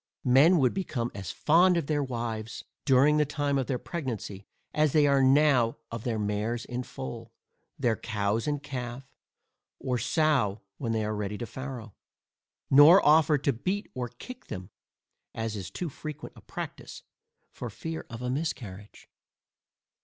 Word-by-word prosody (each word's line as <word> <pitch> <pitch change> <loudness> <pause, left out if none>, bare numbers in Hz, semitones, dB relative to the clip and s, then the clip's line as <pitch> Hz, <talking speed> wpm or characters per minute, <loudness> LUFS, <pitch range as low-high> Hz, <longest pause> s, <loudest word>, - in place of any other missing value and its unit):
Men 140 +8 +6
would 130 -5 +3
become 130 -11 -2
as 95 -3 -6
fond 175 - +4
of 165 - -1
their 150 0 0
wives, 115 -4 -4 0.2
during 140 +2 +5
the 150 - +4
time 145 -1 0
of 130 - -2
their 130 - 0
pregnancy, 120 - -5 0.3
as 155 -2 +2
they 150 -2 +5
are 140 -1 +4
now 130 -4 +4
of 115 -1 -5
their 115 -3 0
mares 105 +3 -2
in 125 0 -4
foal, 65 - -7 0.5
their 120 -4 +1
cows 105 +1 -1
in 145 -1 -1
calf, 130 -2 -6 0.7
or 125 -2 -2
sows 135 - +2 0.2
when 115 -5 -2
they 110 -1 0
are 105 0 -2
ready 105 0 -3
to 120 - -4
farrow; 125 -2 -7 0.8
nor 150 +7 +8
offer 155 0 +5
to 140 0 0
beat 185 - -3
or 125 -2 -3
kick 250 - -11
them 90 -1 -7 0.6
(as 110 -1 -3
is 95 -3 -5
too 175 - -4
frequent 150 0 -8
a - - -14
practice) - - -8 0.5
for 120 - -6
fear 160 +9 -6
of 120 0 -7
a 125 - -2
miscarriage. 115 - -5
130 Hz, 160 wpm, -28 LUFS, 110-150 Hz, 0.8 s, nor